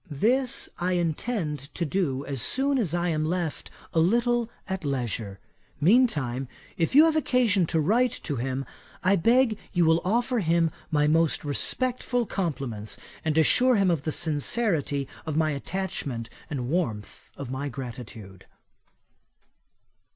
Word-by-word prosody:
This 250 - +1
I 180 +1 0
intend 170 -1 -1 0.2
to 170 - -1
do, 145 -5 -1
as 135 -3 -4
soon 270 - +1
as 175 -8 0
I 175 0 0
am 155 -2 0
left 170 -1 -2 0.2
a 165 - +3
little 235 +6 +2 0.2
at 190 -2 -3
leisure. 120 -8 -3 0.4
Mean 230 - +6
time, 135 - -3 0.3
if 170 +6 -1
you 305 +3 +9
have 320 -1 +2
occasion 240 - +2
to 165 - +1
write 225 +10 +3
to 145 - -2
him, 130 +2 -2 0.4
I 190 +2 +4
beg 230 +3 +3
you 175 -3 +3
will 160 +1 +4
offer 240 +6 +1
him 165 -3 +2 0.2
my 150 -2 +2
most 160 +1 +2
respectful 245 - 0
compliments, 135 - -3 0.3
and 160 -1 0
assure 250 - +5
him 195 -3 +3
of 165 -5 0
the 155 - -2
sincerity 155 - 0 0.2
of 155 -1 -2
my 155 -1 +2
attachment 140 -7 -4 0.2
and 150 - -3
the 125 - -3
warmth 120 - -3
of 140 -3 -6
my 140 +2 -3
gratitude." 115 -6 -9
165 Hz, 150 wpm, -26 LUFS, 140-215 Hz, 0.4 s, you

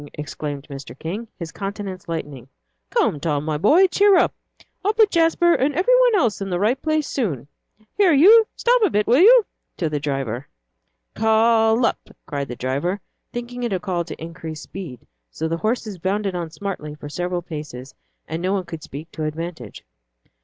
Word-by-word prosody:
exclaimed 145 -1 -6
Mr. 135 -3 -9
King, 200 +10 -5
his 170 -2 -6
countenance 195 -3 -6
lightening. 145 -6 -5 0.4
"Come, 425 - +1
Tom, 150 -1 -1
my 155 -1 -1
boy, 315 - +6
cheer 395 +1 +4
up. - - +3 0.5
I'll 420 +3 +1
put 435 -2 +4
Jasper 335 +1 +4
and 275 0 +1
every 375 +9 +3
one - - +5
else 235 - +1
in 195 - -3
the 175 -1 -1
right 230 +7 +1
place 310 -1 0
soon. 155 - -2 0.5
Here 395 -4 +5
you, 420 +10 +7
stop - - +3
a 420 - +4
bit, 210 0 +1
will 245 +4 +4
you?" 455 +4 +7 0.3
to 165 -5 -1
the 150 - -1
driver. 135 -4 -3 0.7
"K - - -12
lup!" 225 +1 +3
cried 140 -1 -3
the 125 - -6
driver, 140 +11 -2 0.3
thinking 240 +1 -6
it 240 -2 -1
a 185 - 0
call 180 -2 -2
to - - -8
increase 160 -1 -7
speed; 165 -11 -9 0.2
so 160 - -3
the 165 +1 -1
horses 215 -1 -2
bounded 195 +2 -1
on 175 -2 -3
smartly 155 -3 -6
for 150 - -9
several 175 +3 -3
paces, 150 -6 -8 0.3
and 160 +2 -4
no 185 +2 0
one 195 -2 0
could 165 -2 -8
speak 155 +1 -9
to 155 - -4
advantage. 155 - -6
185 Hz, 180 wpm, -22 LUFS, 155-245 Hz, 0.7 s, you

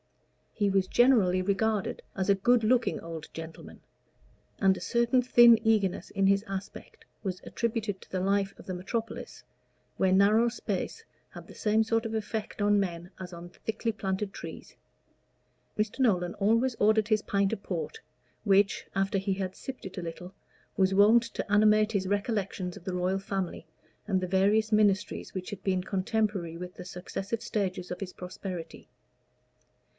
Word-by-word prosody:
He 205 -2 0
was 190 -1 +2
generally 215 -8 +4
regarded 205 +1 0
as 190 -1 -1
a 200 - +6
good 235 +4 +3
looking 245 +2 +2
old 165 -2 -7
gentleman, 165 0 -9 0.8
and 190 -1 +4
a - - -8
certain 235 +1 +2
thin 240 -2 +7
eagerness 205 -4 +1
in 195 -1 +1
his 195 +1 +3
aspect 195 0 -7 0.2
was 185 -3 -3
attributed 220 -4 -2
to - - -17
the 185 - -1
life 195 +1 0
of - - -12
the 185 - -4
metropolis, 220 +6 -5 0.5
where 190 - +3
narrow 210 +5 +5
space 350 - -4 0.3
had - - -11
the - - -12
same 215 +1 +2
sort 225 +1 0
of 225 - -3
effect 220 -1 -4
on 205 0 +4
men 175 -2 -3
as 185 -1 -7
on 170 0 -9
thickly 220 +5 -3
planted 195 -1 -3
trees. - - -9 1.0
Mr. 215 +4 -1
Nolan 180 -8 +2
always 230 +5 +2
ordered 215 0 +3
his 215 -1 +2
pint 200 +1 +1
of 200 - -5
port, 185 - -4 0.4
which, 200 0 +3
after 195 +1 +1
he 195 0 -1
had 190 -1 -4
sipped 265 -5 -8
it 190 0 -8
a - - -5
little, 180 +3 -7 0.4
was 190 0 +3
wont 215 +4 +6
to 230 -3 -6
animate 215 +1 +5
his 195 -3 -1
recollections 200 -3 -2
of - - -12
the 185 - -3
Royal 185 +2 0
Family, 195 -2 -4 0.4
and 190 -3 +2
the 185 - -3
various 205 +4 +2
ministries 210 -2 +1
which 185 -1 -5
had 205 - -7
been 185 -2 0
contemporary 195 -3 -1
with 180 +1 -8
the - - -9
successive 195 +4 -5
stages 190 -5 -2
of 180 - -4
his 185 -2 -6
prosperity. 180 -1 -7
200 Hz, 165 wpm, -29 LUFS, 185-220 Hz, 1.0 s, thin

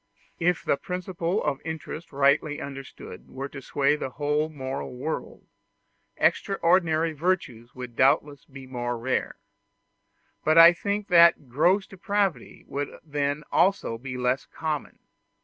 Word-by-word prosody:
If 175 0 +1
the - - +2
principle 180 +1 -3
of 145 -2 -1
interest 160 +1 -6
rightly 140 +2 +2
understood 135 -1 -9
were 135 +1 -5
to 135 - -9
sway 140 +2 +1
the 150 - -4
whole 150 +3 -1
moral 135 -3 -5
world, 145 +6 -5 0.7
extraordinary 165 -4 +2
virtues 140 -8 -2
would 125 -2 -8
doubtless 140 +2 +2
be 135 -1 -11
more 120 -1 -3
rare; 125 +3 -2 1.1
but 155 +1 +3
I 165 +1 +10
think 200 +4 -3
that 170 -5 +6
gross 180 +10 +3
depravity 195 - -2
would 145 0 -3
then 145 -1 -2
also 185 -12 +2
be 130 0 -6
less 125 +2 0
common. 155 -2 -4
150 Hz, 130 wpm, -26 LUFS, 135-170 Hz, 1.1 s, I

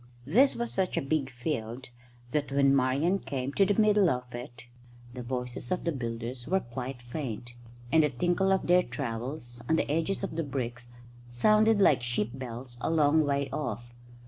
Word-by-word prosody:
This 245 - +4
was 235 0 -3
such 190 -1 0
a - - +4
big 135 -1 -1
field 125 -1 -4 0.4
that 145 -1 -1
when 140 0 +4
Marian 140 +9 +2
came 135 -3 -4
to 195 +4 +4
the 205 +1 +1
middle 210 -3 +5
of 125 -2 -3
it 120 0 -8 0.5
the 125 - -6
voices 125 0 -5
of 180 - 0
the 170 - 0
builders 120 -2 -5
were 190 +4 +2
quite 125 +1 -6
faint, 120 -2 -5 0.4
and 160 - +6
the 150 - +3
tinkle 175 +8 +1
of 190 - +2
their 180 +1 +5
trowels 120 -2 -5
on 160 - +4
the - - +1
edges 165 +6 -1
of 195 - -3
the 165 - 0
bricks 120 -4 -4 0.4
sounded 215 - +4
like 150 -10 +5
sheep 120 -2 -1
bells 125 -1 -8
a - - 0
long 155 -1 +4
way 140 -1 0
off. 120 -5 -4
135 Hz, 180 wpm, -29 LUFS, 120-165 Hz, 0.5 s, and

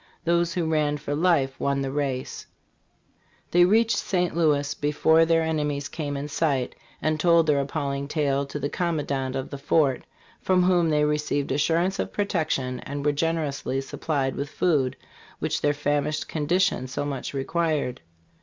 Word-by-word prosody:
Those 170 +1 +1
who 175 -2 0
ran 150 -2 +1
for 145 0 -4
life 145 -5 +1
won 140 0 0
the 135 - -3
race. 135 -3 -3 1.0
They 175 0 +6
reached 220 +2 +3
St. 180 -3 -1
Louis 150 -3 +2
be 145 0 -1
fore 160 +2 +4
their 165 0 +3
enemies 150 -3 -1
came 145 -3 -4
in 140 +1 -4
sight, 140 -4 0 0.3
and 155 0 +1
told 170 0 +4
their 150 -2 +3
appalling 140 0 -2
tale 140 -2 0
to 145 - -5
the 145 -1 -2
com 170 +2 -1
mandant 135 -3 -2
of 130 - -4
the 140 - -6
fort, 140 -2 +1 0.4
from 185 -1 +3
whom 175 -2 +3
they 150 -1 +3
received 150 -2 -1
assurances 165 +7 +1
of - - -3
protection, 155 -10 -1
and 140 +2 -6
were 150 - +4
generously 145 -3 -1
supplied 135 0 -2
with 140 +1 -4
food, 145 -8 +1 0.4
which 155 +1 -2
their 145 - +3
famished 145 +1 -1
condition 165 -2 0
so 145 +3 -3
much 140 -1 -4
required. 150 -2 -1
150 Hz, 165 wpm, -25 LUFS, 140-165 Hz, 1.0 s, They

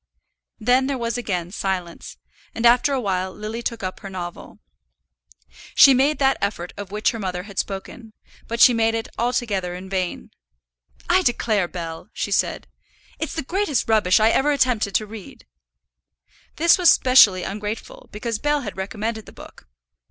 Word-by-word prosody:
Then 250 +4 +2
there 275 -1 -2
was 235 -1 -3
again 180 -8 -3
silence, 185 -4 -4 0.4
and 230 - -2
after 245 +5 +5
a 270 - 0
while 190 -4 -2
Lily 215 +4 -6
took 230 -3 -4
up 185 0 -4
her 195 - -8
novel. 175 -2 -8 1.2
She 275 - +8
made 275 +4 +2
that 270 -1 +2
effort 200 -3 -3
of 200 -1 -7
which 210 +1 +1
her 230 - -6
mother 180 -3 -4
had 200 -1 -6
spoken, 215 +3 -6 0.3
but 230 +1 -4
she 250 - +8
made 225 0 +1
it 225 - -4
altogether 215 -7 -1
in 190 +1 -9
vain. 180 - -3 0.8
"I 365 +2 +4
declare, 220 - +1
Bell," 170 +2 -7
she 205 - -4
said, - - 0 0.5
"it's 315 - -4
the 320 - -3
greatest 365 -1 -1
rubbish 215 -3 +3
I 220 +1 +4
ever 290 +2 +2
attempted 250 -8 +1
to 215 - +2
read." 215 -2 -11 1.1
This 335 +3 +4
was 355 - +6
specially 210 -8 +6
ungrateful, 215 - -6
because 220 +1 -4
Bell 295 +2 0
had 205 -6 -6
recommended 220 +3 -4
the - - -11
book. - - -14
220 Hz, 165 wpm, -22 LUFS, 190-250 Hz, 1.2 s, She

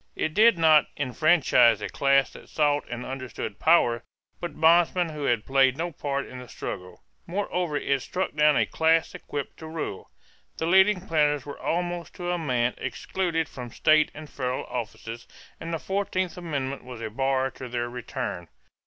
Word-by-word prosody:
It 155 - -1
did 220 0 +6
not 160 -2 +5
enfranchise 130 -4 +4
a 105 - -4
class 140 -1 +2
that - - -13
sought 145 -1 +1
and 120 +1 -5
understood 130 -5 -6
power, 120 -8 +4 0.4
but 170 -4 -6
bondmen 170 +2 +4
who 150 -2 -5
had 120 -4 +1
played 135 -1 +3
no 170 +2 -2
part 140 -2 -3
in 125 - -9
the 125 - -10
struggle. 90 -4 -7 0.2
Moreover 180 -4 -1
it 140 -1 0
struck 185 +7 -3
down 150 0 +4
a - - +3
class 160 0 +2
equipped 145 -2 -6
to 160 - -9
rule. 155 -11 -5 0.5
The 160 - -2
leading 190 +2 +5
planters 150 -5 +1
were 145 - -8
almost 175 0 -2
to 175 0 -3
a 175 - -1
man 125 -6 0
excluded 170 -4 -2
from 125 -2 -8
state 155 +5 +3
and 155 0 -9
federal 130 -2 -3
offices, 115 0 -6 0.3
and 165 - -6
the 165 - -1
fourteenth 185 -1 -2
amendment 140 -6 -4
was 125 -2 -9
a 110 -1 -5
bar 135 +2 0
to 130 0 -9
their 120 0 -2
return. 120 -7 -5
145 Hz, 170 wpm, -26 LUFS, 125-165 Hz, 0.5 s, did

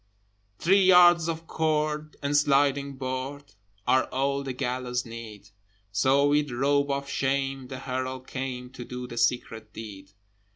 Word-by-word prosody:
Three 195 +4 +4
yards 175 -2 +7
of 165 0 -4
cord 155 -1 -1
and 140 - 0
a - - +1
sliding 140 -1 +3
board 130 +2 -5 0.3
Are 130 - +3
all 140 +1 -1
the 135 -1 -4
gallows' 125 0 -2
need: 110 -3 -10 0.4
So 135 +8 +3
with 145 0 +2
rope 140 +3 +1
of 140 0 -2
shame 135 -1 -1
the 130 0 -7
Herald 130 0 -4
came 130 -2 -5
To 125 - -8
do 125 +1 -6
the 120 -1 -5
secret 115 -3 -1
deed. 100 -3 -9
135 Hz, 150 wpm, -27 LUFS, 125-145 Hz, 0.4 s, yards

